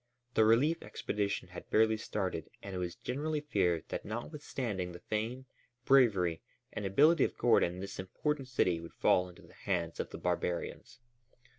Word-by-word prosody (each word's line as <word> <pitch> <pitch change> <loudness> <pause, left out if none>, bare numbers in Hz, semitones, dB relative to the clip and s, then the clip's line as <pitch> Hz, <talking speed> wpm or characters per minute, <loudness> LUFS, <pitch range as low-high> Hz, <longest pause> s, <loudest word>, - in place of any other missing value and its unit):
The 110 - +5
relief 135 +9 +4
expedition 100 -1 -2
had - - -10
barely 110 0 +4
started 95 -6 -3
and 100 - -6
it 90 - -3
was 90 -1 -3
generally 150 +4 -2
feared 90 - +1
that - - -3
notwithstanding 115 - -4
the 85 - -9
fame, 115 +5 -3 0.4
bravery, 100 -11 +4 0.3
and 105 - -2
ability 145 - +5
of - - -1
Gordon 90 -6 +3
this 100 - -7
important 135 +9 -2
city 90 -9 +1
would 85 0 -10
fall 90 0 +3
into 90 - -15
the - - -17
hands 85 -4 -2
of - - -2
the - - -7
barbarians. 85 - -2
105 Hz, 160 wpm, -33 LUFS, 90-130 Hz, 0.4 s, The